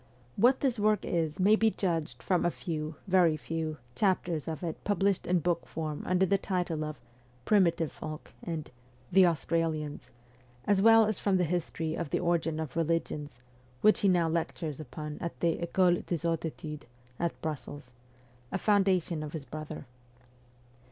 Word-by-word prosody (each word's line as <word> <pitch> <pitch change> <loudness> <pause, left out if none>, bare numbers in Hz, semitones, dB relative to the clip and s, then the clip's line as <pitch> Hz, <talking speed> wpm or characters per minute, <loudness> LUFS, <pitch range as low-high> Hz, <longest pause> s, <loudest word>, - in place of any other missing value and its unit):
What 245 +5 +4
this 255 -5 +1
work 210 -1 +2
is 160 -2 -1
may 205 +4 +6
be 220 0 +3
judged 165 - -2
from 180 -2 +2
a 175 - +3
few, 155 -2 -4
very 180 -5 +4
few, 160 0 -3 0.2
chapters 175 - 0
of 160 +1 -4
it 165 -2 -4
published 200 -2 +1
in 180 -1 +2
book 170 +1 0
form 155 -2 -4
under 185 +1 +3
the 195 +1 +2
title 175 -5 -1
of 155 0 -5 0.2
' 125 0 -31
Primitive 170 -6 +3
Folk 155 0 -8
' - - -25
and 155 -2 -5 0.2
' 125 0 -30
The 190 0 +7
Australians,' 155 -4 -1 0.6
as 200 -2 +3
well 225 +1 +7
as 215 -1 -1
from 195 -2 +2
the 180 - +2
history 165 -1 -2
of 165 -2 -3
the - - 0
origin 165 -2 0
of 155 -4 -5
religions, 150 -5 -2 0.4
which 215 - +5
he 200 - +3
now 175 -2 +3
lectures' 160 -2 -2
upon 150 +1 -7
at 170 - -5
the 170 -1 +1
ficole 175 +1 +2
des 170 -1 -2
Hautes 165 0 0
Etudes, 150 -2 -6 0.3
at 170 -1 -2
Brussels 145 -4 -5 0.6
a - - 0
foundation 190 -5 +2
of 150 -1 -6
his 155 -4 -5
brother. 155 +3 -7
165 Hz, 170 wpm, -30 LUFS, 155-185 Hz, 0.6 s, The